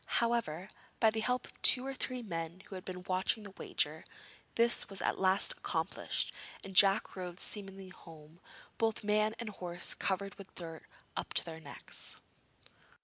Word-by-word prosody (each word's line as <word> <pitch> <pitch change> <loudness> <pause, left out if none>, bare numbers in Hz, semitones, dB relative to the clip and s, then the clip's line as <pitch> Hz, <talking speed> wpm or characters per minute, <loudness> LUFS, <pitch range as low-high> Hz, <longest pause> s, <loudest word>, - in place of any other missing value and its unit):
However, 220 -7 0 0.3
by 220 - +5
the 220 - +1
help 250 +3 0
of - - -15
two 255 0 +10
or 270 - -3
three 255 -1 -4
men 170 -2 -5
who 200 - -13
had 185 -1 -6
been 180 -1 -6
watching 185 +4 +1
the 200 -2 -10
wager, 160 +1 0 0.5
this 235 0 +3
was 195 - -5
at - - 0
last 190 +1 +4
accomplished, - - -1 0.3
and 195 -1 -8
Jack 195 +2 +5
rode 180 -1 -6
smilingly 195 -2 -4
home, 160 -2 -14 0.4
both 225 -2 +1
man 215 +1 +2
and 235 -2 -5
horse 175 -4 -4
covered 195 +1 -1
with 195 - -12
dirt 165 -2 -8 0.3
up - - -4
to - - +3
their 160 -1 -7
necks. 145 -3 -4
195 Hz, 165 wpm, -33 LUFS, 175-215 Hz, 0.5 s, two